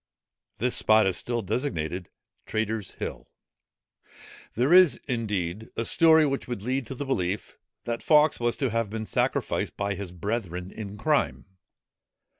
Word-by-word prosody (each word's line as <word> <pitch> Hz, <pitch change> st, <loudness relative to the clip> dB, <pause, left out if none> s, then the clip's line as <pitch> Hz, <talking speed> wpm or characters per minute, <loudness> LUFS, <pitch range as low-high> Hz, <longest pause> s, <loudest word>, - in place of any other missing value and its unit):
This 125 Hz, +4 st, 0 dB
spot 110 Hz, -1 st, +4 dB
is 95 Hz, -2 st, +1 dB
still 120 Hz, +4 st, -2 dB
designated 90 Hz, -, -3 dB, 0.4 s
Traitors' 110 Hz, -1 st, -2 dB
Hill. -, -, -6 dB, 1.3 s
There 130 Hz, -, +3 dB
is, 180 Hz, -8 st, +7 dB
indeed, 105 Hz, -4 st, -2 dB
a 115 Hz, -, 0 dB
story, 160 Hz, +4 st, +6 dB
which 135 Hz, -1 st, -2 dB
would 120 Hz, -5 st, -5 dB
lead 130 Hz, +1 st, -1 dB
to 135 Hz, -, -6 dB
the 145 Hz, -, -4 dB
belief, 100 Hz, -7 st, -2 dB, 0.3 s
that 115 Hz, -1 st, -3 dB
Fawkes 150 Hz, -1 st, +4 dB
was 120 Hz, 0 st, 0 dB
to 135 Hz, -5 st, 0 dB
have 115 Hz, -2 st, 0 dB
been 110 Hz, +1 st, -4 dB
sacrificed -, -, -1 dB
by 100 Hz, 0 st, -1 dB
his 95 Hz, -2 st, -6 dB
brethren 90 Hz, -1 st, -4 dB
in 105 Hz, -2 st, -7 dB
crime. 150 Hz, +6 st, 0 dB
110 Hz, 145 wpm, -26 LUFS, 100-130 Hz, 1.3 s, is